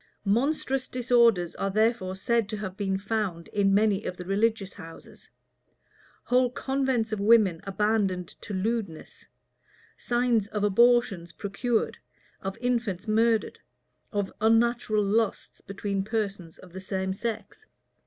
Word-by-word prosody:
Monstrous 260 Hz, +4 st, 0 dB
disorders 235 Hz, -8 st, +3 dB
are 195 Hz, -, -1 dB
therefore 215 Hz, -2 st, +1 dB
said 225 Hz, +2 st, 0 dB
to 215 Hz, -, -4 dB
have 190 Hz, -3 st, -6 dB
been 195 Hz, -1 st, -1 dB
found 195 Hz, -4 st, -3 dB
in 200 Hz, -1 st, +2 dB
many 205 Hz, 0 st, +2 dB
of 180 Hz, -, -4 dB
the 180 Hz, -, -7 dB
religious 200 Hz, +1 st, 0 dB
houses; 165 Hz, -4 st, -13 dB, 0.9 s
whole 250 Hz, 0 st, +3 dB
convents 260 Hz, -3 st, -1 dB
of 215 Hz, -, -2 dB
women 205 Hz, -5 st, +4 dB
abandoned 195 Hz, -3 st, 0 dB
to -, -, -8 dB
lewdness; 200 Hz, -3 st, -4 dB, 0.7 s
signs 240 Hz, -3 st, +1 dB
of 210 Hz, -1 st, -3 dB
abortions 210 Hz, -4 st, +3 dB
procured, 225 Hz, +3 st, -2 dB, 0.4 s
of 195 Hz, 0 st, -5 dB
infants 235 Hz, -6 st, -2 dB
murdered, 225 Hz, 0 st, +1 dB, 0.5 s
of 205 Hz, -2 st, -2 dB
unnatural 225 Hz, -1 st, +2 dB
lusts 215 Hz, +2 st, -1 dB
between 200 Hz, 0 st, -3 dB
persons 200 Hz, -6 st, -3 dB
of 180 Hz, -2 st, -15 dB
the 190 Hz, -, -7 dB
same 190 Hz, 0 st, -2 dB
sex. 230 Hz, -, -6 dB
210 Hz, 125 wpm, -27 LUFS, 195-235 Hz, 0.9 s, women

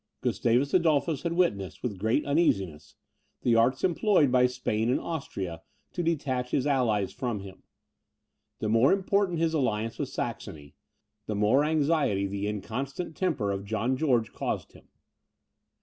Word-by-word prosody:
Gustavus 125 Hz, +4 st, +1 dB
Adolphus 160 Hz, -4 st, +2 dB
had 170 Hz, +1 st, -2 dB
witnessed, 100 Hz, -, 0 dB
with 105 Hz, -7 st, -3 dB
great 110 Hz, +8 st, +1 dB
uneasiness, 95 Hz, -, 0 dB, 0.5 s
the 120 Hz, -, +3 dB
arts 125 Hz, +4 st, +2 dB
employed 185 Hz, -, +3 dB
by 125 Hz, 0 st, +5 dB
Spain 120 Hz, -3 st, -1 dB
and 125 Hz, -, +2 dB
Austria 95 Hz, -, -5 dB, 0.3 s
to 175 Hz, -, -2 dB
detach 135 Hz, -7 st, -1 dB
his 130 Hz, -, 0 dB
allies 120 Hz, -8 st, +1 dB
from 120 Hz, -5 st, -3 dB
him. 95 Hz, -1 st, -11 dB, 1.0 s
The 110 Hz, -, -3 dB
more 115 Hz, -, +4 dB
important 195 Hz, -2 st, +1 dB
his 165 Hz, 0 st, +1 dB
alliance 115 Hz, -6 st, -1 dB
with -, -, -2 dB
Saxony, 70 Hz, -2 st, -6 dB, 0.5 s
the 105 Hz, -, -2 dB
more 105 Hz, +8 st, +3 dB
anxiety 150 Hz, -9 st, +1 dB
the 100 Hz, +1 st, -3 dB
inconstant 135 Hz, -, -4 dB
temper 150 Hz, -, 0 dB
of 100 Hz, 0 st, -3 dB
John 110 Hz, +5 st, -1 dB
George 125 Hz, -6 st, +1 dB
caused -, -, -3 dB
him. -, -, -18 dB
125 Hz, 145 wpm, -28 LUFS, 105-155 Hz, 1.0 s, by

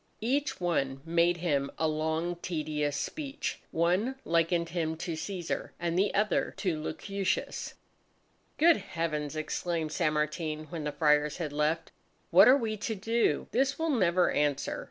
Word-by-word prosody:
Each 280 Hz, +5 st, 0 dB
one 135 Hz, -7 st, 0 dB
made 170 Hz, +1 st, +3 dB
him 145 Hz, -5 st, 0 dB
a 160 Hz, -, +1 dB
long 160 Hz, +3 st, -1 dB
tedious 150 Hz, -4 st, -2 dB
speech; 285 Hz, -, -4 dB
one 180 Hz, +10 st, +1 dB
likened 170 Hz, 0 st, +1 dB
him 160 Hz, -2 st, -2 dB
to 175 Hz, +1 st, -4 dB
Cæsar 175 Hz, +1 st, -4 dB
and 170 Hz, -1 st, -1 dB
the 195 Hz, +3 st, +2 dB
other 210 Hz, +1 st, +1 dB
to 165 Hz, -6 st, -1 dB
Lucullus. 195 Hz, +5 st, -3 dB, 0.8 s
"Good 330 Hz, +2 st, +6 dB
heavens!" 160 Hz, -6 st, -3 dB
exclaimed 160 Hz, 0 st, -2 dB
San 155 Hz, 0 st, +1 dB
Martin, 155 Hz, 0 st, -2 dB
when 160 Hz, -3 st, -4 dB
the 150 Hz, -, -1 dB
Friars 150 Hz, -1 st, +2 dB
had 155 Hz, -5 st, -4 dB
left. 150 Hz, +2 st, 0 dB, 0.4 s
"What -, -, +8 dB
are 260 Hz, +2 st, +8 dB
we 220 Hz, -4 st, -2 dB
to 220 Hz, +2 st, -3 dB
do? 225 Hz, +4 st, +1 dB
This 270 Hz, +3 st, +1 dB
will 320 Hz, 0 st, 0 dB
never 185 Hz, -7 st, +3 dB
answer!" 145 Hz, -2 st, 0 dB
170 Hz, 150 wpm, -30 LUFS, 155-195 Hz, 0.8 s, What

